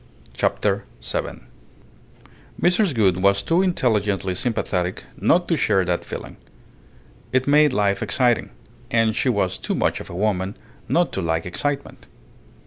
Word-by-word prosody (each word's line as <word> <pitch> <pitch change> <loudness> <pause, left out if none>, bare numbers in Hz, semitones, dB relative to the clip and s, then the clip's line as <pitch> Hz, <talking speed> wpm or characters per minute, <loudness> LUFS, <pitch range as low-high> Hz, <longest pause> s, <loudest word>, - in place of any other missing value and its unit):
CHAPTER - - 0 0.2
SEVEN - - -4 1.1
Mrs. 180 -2 +2
Gould 95 -5 +2
was 100 0 +3
too 170 +2 +2
intelligently 105 - +1
sympathetic 90 -3 -2
not 175 +1 +2
to 170 - +2
share 95 - +2
that 90 0 -1
feeling. - - -8 0.9
It 130 0 +2
made 150 0 +5
life 100 -4 +1
exciting, 120 +2 +1 0.4
and 115 -2 +2
she 130 - +1
was 100 -6 0
too - - -2
much - - 0
of - - -9
a - - -7
woman 100 0 -1 0.3
not 175 0 +2
to 95 - -2
like 80 -1 -1
excitement. 140 +10 -4
105 Hz, 135 wpm, -22 LUFS, 95-140 Hz, 1.1 s, made